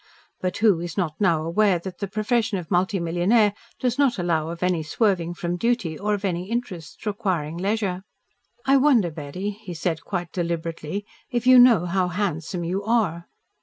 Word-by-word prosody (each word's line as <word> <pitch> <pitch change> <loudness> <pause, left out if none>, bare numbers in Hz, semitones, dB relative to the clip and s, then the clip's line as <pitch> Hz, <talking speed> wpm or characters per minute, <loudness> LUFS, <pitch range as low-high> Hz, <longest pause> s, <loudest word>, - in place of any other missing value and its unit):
But 185 -1 -2
who 205 -6 +4
is 170 +2 -6
not 165 -5 -1
aware 175 +2 +3
that 180 +2 -8
the 200 - -2
profession 215 +2 0
of 175 -1 -7
multimillionaire 185 +3 +2 0.3
does 250 +1 -1
not 270 -5 +3
allow 165 -3 0
of 170 +1 -5
any 180 -3 +1
swerving 175 +1 0
from 175 0 -3
duty 230 -6 0
or 210 +5 0
of 205 0 -5
any 180 0 -2
interests 205 -8 -5
requiring 185 -8 -1
leisure? 195 -1 -1 0.6
"I 275 +1 +5
wonder, 255 - +4
Betty," 155 +7 -5
he 200 -4 -9
said 165 -1 -2
quite 175 -4 -4
deliberately, 170 +2 -3 0.2
"if 240 -2 -2
you 255 0 +8
know 235 -8 +6
how 180 +1 +1
handsome 175 -2 -2
you 185 +4 -2
are?" 200 -7 0
185 Hz, 165 wpm, -24 LUFS, 170-215 Hz, 0.6 s, you